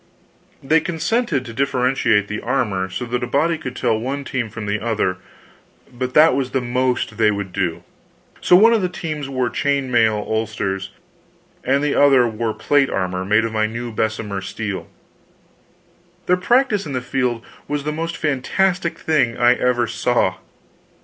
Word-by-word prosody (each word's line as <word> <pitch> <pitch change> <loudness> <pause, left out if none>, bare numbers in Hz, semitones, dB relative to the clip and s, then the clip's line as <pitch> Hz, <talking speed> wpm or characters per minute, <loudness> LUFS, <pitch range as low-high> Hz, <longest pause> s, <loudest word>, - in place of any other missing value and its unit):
They 155 +4 +4
consented 165 - -1
to 115 - -8
differentiate 125 -5 +1
the 105 +1 -4
armor 100 -8 -1
so 95 +6 -4
that 120 +1 -2
a - - -2
body 155 +6 +1
could 125 -5 -6
tell 110 - 0
one 135 +4 -3
team 125 -4 -3
from 110 0 -7
the 105 +1 -1
other, 105 -5 -1 0.8
but 125 +1 -4
that 155 0 +7
was 135 -2 -1
the 130 - 0
most 125 -3 -1
they 110 -1 +4
would 100 -3 -3
do. 90 -4 -2 0.6
So, 180 - +5
one 225 +5 +7
of 225 - +2
the 180 - 0
teams 155 -5 -5
wore 130 -3 -1
chain 140 -2 -1
mail 110 -3 +3
ulsters, 100 -3 -2 0.7
and 140 +2 +1
the 150 - +1
other 135 -4 +5
wore 110 0 -3
plate 145 -2 +2
armor 90 -1 -2
made 105 +4 +2
of 115 - -4
my 110 0 +1
new 120 +2 -5
Bessemer 110 -2 -2
steel. 105 -1 -5 1.4
Their 180 - +3
practice 215 - +2
in 140 - -5
the 130 - -1
field 125 -2 -2 0.2
was 145 0 -2
the 150 - -2
most 165 +2 -4
fantastic 170 +4 0
thing 135 -9 +1
I 120 0 +5
ever 125 -1 +1
saw. 110 -4 0
125 Hz, 170 wpm, -20 LUFS, 110-145 Hz, 1.4 s, that